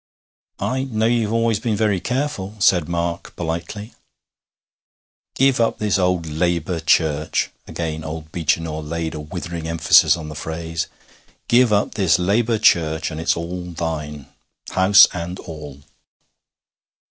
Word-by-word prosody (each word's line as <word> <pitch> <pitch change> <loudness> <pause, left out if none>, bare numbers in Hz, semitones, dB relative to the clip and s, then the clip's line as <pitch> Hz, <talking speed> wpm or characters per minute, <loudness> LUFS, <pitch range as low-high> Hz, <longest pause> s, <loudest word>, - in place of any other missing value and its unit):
'I 130 +1 -2
know 110 -4 -1
you've 115 -2 +1
always 115 -2 +1
been 110 -1 -1
very 105 -3 +1
careful,' 125 -3 -3
said 90 -4 +3
Mark 85 0 -3
politely. 85 +6 -5 1.4
'Give 135 -1 +3
up 115 - +1
this 105 -2 0
old 90 -2 +1
Labour 85 +2 -1
Church' 80 -1 +1 0.2
again 80 -2 -4
old 80 0 -7
Beechinor 80 -1 -1
laid 80 +1 -4
a 75 - -5
withering 85 +1 -6
emphasis 85 0 +5
on 80 -2 -7
the 75 - -7
phrase 80 +1 -4 0.6
'give 120 -1 +4
up 105 0 +1
this 95 -6 +3
Labour 110 +5 +1
Church, 80 -7 +2
and 80 0 -5
its 85 - +1
all 90 +2 -5
thine 80 -4 -5 0.5
house 95 +2 +7
and 90 +1 -5
all.' 75 -4 -10
85 Hz, 135 wpm, -21 LUFS, 80-105 Hz, 1.4 s, house